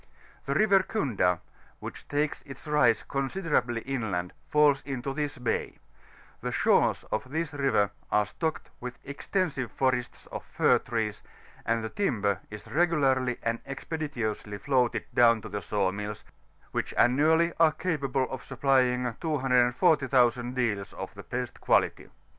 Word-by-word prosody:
The - - 0
River 200 -3 +5
Kunda, 115 - 0 0.4
which - - -9
takes 145 +1 -1
its 135 - -11
rise 150 -7 +3
considerably 135 -4 -1
inland, 110 -10 -3 0.2
falls 150 -2 +4
into 135 0 -4
this 145 0 -3
ba^; 125 -1 -2 0.6
the - - -3
shores - - +3
of 120 +4 -2
this 160 +2 -2
river 130 -8 +2 0.2
are 105 0 +3
stocked 160 - -4
with 125 0 -6
extensive 140 - -2
forests 130 -2 -1
of - - -5
fir - - +3
trees, 110 -2 -3 0.5
and 115 +1 +1
the 110 - -3
timber 105 - 0
is 105 -1 -9
regularly 135 -7 +2
and 115 0 0
expeditiously 130 -8 -4
floated 120 0 +1
down 115 -2 +5
to 110 - -7
the 100 0 -4
saw 100 -3 0
nulls, 105 +1 -5 0.5
which - - -3
annually 160 +7 +4
are 165 -1 +6
capable 140 -7 -1
of 130 - -5
supplying 125 -3 +1
240,000 125 -3 +2
deals, 110 -6 -1
of - - -7
the - - -9
best - - -5
quality. - - +2
130 Hz, 135 wpm, -28 LUFS, 115-145 Hz, 0.6 s, are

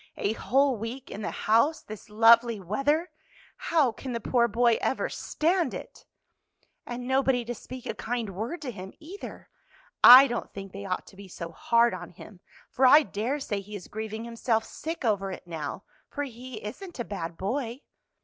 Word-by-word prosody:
A 205 - 0
whole 270 +2 +2
week 235 +5 -7
in 210 - -6
the - - -2
house 255 +9 +2
this 215 +1 -10
lovely 230 +1 +5
weather! 275 - 0 0.4
How 325 - +2
can 250 +3 -7
the 235 - -2
poor 235 +1 +2
boy 235 +1 +2
ever - - 0
stand 340 +2 0
it! - - -10 0.8
"And 245 0 -5
nobody 265 -2 +2
to 240 - -3
speak 250 +2 -10
a - - -3
kind 235 -3 -3
word 230 - -5
to 260 - -4
him, 190 -3 -9
either. 345 +6 -10 0.6
I 255 +3 +12
don't 240 -3 -4
think 195 -1 -7
they 200 +1 -8
ought 185 -1 -3
to - - -16
be 200 0 -11
so 170 -2 -7
hard 235 +6 +2
on 175 -2 -7
him, 185 +2 -13 0.3
for 260 +1 +4
I 295 +4 +8
dare 245 +5 -2
say 210 -7 -3
he 205 +2 -9
is 185 - -8
grieving 220 +1 -5
himself 230 -1 -1
sick 320 +1 -6
over 195 -3 0
it 185 - -8
now, 165 +2 -5 0.3
for 290 - -3
he 255 -1 -8
isn't 305 - -8
a 240 - -2
bad 170 -4 -5
boy." 240 +5 -3
235 Hz, 185 wpm, -27 LUFS, 205-265 Hz, 0.8 s, I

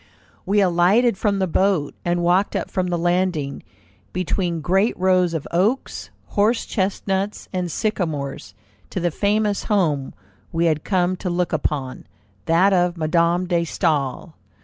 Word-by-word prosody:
We 205 +1 +3
alighted 195 +6 +3
from 200 +1 0
the 190 - +1
boat, 185 -4 +1
and 175 0 0
walked 180 +3 +2
up - - -3
from 185 -1 -1
the 175 -1 -1
landing, 175 -5 0 0.5
between 180 -1 -1
great 190 +8 +1
rows 180 -2 +2
of 155 - -4
oaks, 205 +10 0 0.2
horsechestnuts, 200 -2 0
and 180 -2 -2
sycamores, 150 - -3 0.3
to - - -3
the 175 -1 0
famous 205 +2 0
home 155 -10 0 0.4
we 165 +1 +1
had 155 -3 +1
come 185 -2 +1
to 180 - -4
look 175 0 -1
upon, 140 -4 -2 0.4
that 180 +5 +4
of 175 -1 +2
Madame 170 +2 +1
de 175 -1 +1
Staël. 155 -1 -1
180 Hz, 140 wpm, -22 LUFS, 165-195 Hz, 0.5 s, that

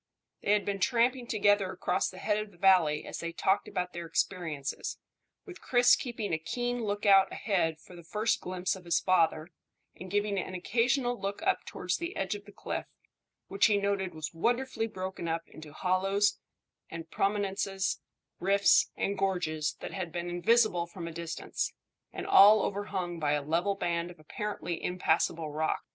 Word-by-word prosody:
They 205 - +2
had 210 - +1
been 200 -1 -2
tramping 240 +5 +2
together 205 -3 +2
across 180 0 0
the 185 - -11
head 210 +2 0
of 215 0 -5
the 185 - -21
valley 175 -5 +4
as - - -6
they 170 - -4
talked 190 +4 +1
about 180 0 -3
their 170 -1 -6
experiences, 160 -6 -2 0.5
with 370 -3 -11
Chris 245 -1 +5
keeping 230 -7 -4
a 160 - +1
keen 245 +9 -2
lookout 200 -2 +4
ahead 165 -7 0
for 180 - -15
the 170 - -11
first 210 +6 0
glimpse 185 0 -2
of 185 -2 -12
his 170 -1 +2
father, 165 -3 +2 0.5
and 185 - -9
giving 205 0 0
an 185 - -5
occasional 245 +6 0
look 200 +9 -3
up 385 +1 +1
towards - - -2
the 340 +1 -5
edge 190 0 -1
of 205 0 -8
the 205 - -13
cliff, - - -5 0.6
which 195 +3 +3
he 210 -2 +3
noted 200 -3 -1
was 155 +1 -5
wonderfully 235 +5 0
broken 185 -4 -5
up 165 0 -2
into 155 -1 -12
hollows 195 +5 +1 0.5
and 165 0 -8
prominences, 195 -1 -1 0.4
rifts 200 +2 +4
and 200 0 -1
gorges 160 -6 0
that - - -6
had 185 -4 -4
been 175 +1 -4
invisible 175 -1 +3
from 170 -1 -7
a - - -5
distance, 165 0 -4 0.4
and - - -6
all 210 +2 +7
overhung 190 -4 -3
by 150 -2 +1
a 145 -1 0
level 170 +7 0
band 170 -2 -1
of 175 - -13
apparently 175 0 -5
impassable 165 -3 0
rock. 155 +1 -1
190 Hz, 175 wpm, -30 LUFS, 170-205 Hz, 0.6 s, all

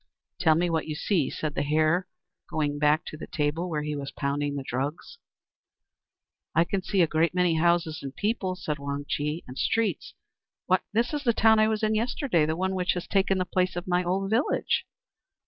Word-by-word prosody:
"Tell 160 -3 +4
me 175 +2 +2
what 165 -2 -1
you 155 - -3
see," 165 -2 +1
said 155 -2 -3
the - - -1
Hare, 155 +5 +2 0.4
going 145 -2 -1
back 150 +3 +3
to 155 - -7
the - - -8
table 155 +4 -1
where 150 -3 -2
he 150 0 -3
was 140 -1 -5
pounding 145 0 -2
the 140 - -3
drugs. 140 - -4 1.4
"I 165 - +6
can 190 +2 -2
see 190 0 +2
a - - +3
great 165 +3 +1
many 180 -2 +3
houses 170 -1 +2
and 135 -1 -7
people," 205 -3 -1
said 155 -5 -4
Wang 140 0 -4
Chih, 150 +3 -2
"and 125 +1 -8
streets 220 -8 0 0.5
why, 185 0 +3
this 235 +5 +1
is 295 -1 -2
the 235 -3 +3
town 220 0 +5
I 215 - +5
was 220 0 -1
in 215 0 +2
yesterday, 220 - +1
the 160 - 0
one 190 +1 0
which 180 -1 +1
has 180 - -4
taken 195 -1 +2
the 185 - 0
place 185 0 0
of 175 - -4
my 180 0 +2
old 195 +3 -1
village." 235 +6 +1
170 Hz, 205 wpm, -27 LUFS, 150-190 Hz, 1.4 s, I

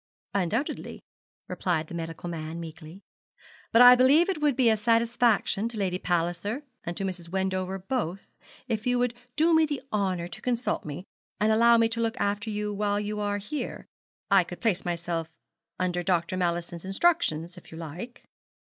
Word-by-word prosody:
'Undoubtedly,' 205 - -2 0.4
replied 165 -4 -1
the 155 - -11
medical 165 0 -5
man, 165 -1 -5
meekly. 160 +3 -10 0.7
'But 230 +2 +7
I 245 0 +11
believe 285 +8 +5
it 350 -6 -2
would 295 -3 +3
be 255 -2 +3
a - - +4
satisfaction 230 -1 +2
to 235 - -3
Lady 185 -3 -1
Palliser 175 - -1 0.2
and 175 0 -5
to - - -2
Mrs. 180 -3 -4
Wendover 190 0 -1
both 195 -2 -3 0.4
if 225 -1 -2
you 245 0 +2
would 245 -1 +1 0.2
do 325 +2 +4
me 320 -1 +5
the 290 -2 -4
honour 185 -4 0
to 170 - -9
consult 245 0 -1
me, 150 +4 -6 0.4
and 215 +1 +3
allow 235 +2 +6
me 230 0 +4
to 230 0 -2
look 230 +2 -1
after 205 +1 -1
you 210 0 -2
while 205 0 0
you 210 0 -3
are 205 0 0
here, 210 +9 -5 0.5
I 195 -2 +6
could 175 +1 -9
place 205 -6 +1
myself 170 -2 -3 0.5
under 180 -1 0
Dr. 175 0 0
Mallison's 170 -1 -2
instructions, 190 - +1
if 180 - -14
you 160 - -9
like.' 170 - -8
200 Hz, 175 wpm, -27 LUFS, 175-235 Hz, 0.7 s, I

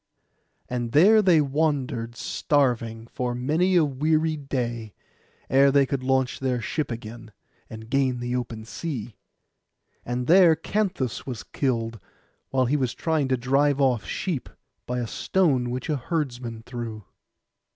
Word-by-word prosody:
And 120 -2 -3
there 210 +9 +7
they 180 -6 +5
wandered 135 -5 -1
starving 120 -5 0
for 120 +1 -3
many 160 +9 +1
a 170 -3 +5
weary 155 +3 +1
day, 120 -7 -4 0.5
ere 140 +1 +5
they 140 0 +4
could 135 0 -2
launch 130 0 0
their 130 -2 0
ship 150 +6 -2
again, 115 -1 -8 0.4
and 110 0 -9
gain 130 -1 +1
the 120 +1 -2
open 115 -3 -4
sea. 115 -2 -5 0.9
And 125 +1 -3
there 170 +1 +6
Canthus 185 - -2
was 125 -5 -5
killed, 115 -4 -2 0.5
while 130 -1 +2
he 140 +5 +1
was 130 -4 -1
trying 160 -4 0
to 130 -1 +1
drive 135 +3 +2
off 130 -5 +2
sheep, 170 -9 -3 0.4
by 125 - -2
a 120 - -1
stone 135 - +1
which 125 +4 -4
a 150 -3 0
herdsman 125 -6 -3
threw. 115 -3 -6
130 Hz, 140 wpm, -25 LUFS, 120-150 Hz, 0.9 s, there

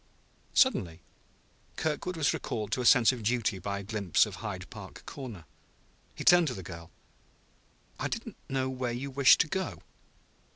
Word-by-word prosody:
Suddenly 90 - +2 0.7
Kirkwood 160 +3 -2
was 150 -3 +2
recalled 105 -3 -4
to 125 - 0
a 120 - +2
sense 125 -1 +7
of 125 -2 -6
duty 110 -3 0
by 100 +2 -3
a 100 - -6
glimpse 100 -3 +2
of - - -8
Hyde - - -6
Park - - -10
Corner. 115 - -8 0.7
He - - -6
turned 175 -2 +6
to 125 - -2
the 95 - -7
girl. 85 -1 -9 1.1
"I - - -1
didn't - - -5
know 130 -1 0
where 130 -2 -3
you 135 +3 -5
wished 135 0 +6
to - - 0
go 190 +4 -4
125 Hz, 165 wpm, -29 LUFS, 100-140 Hz, 1.1 s, sense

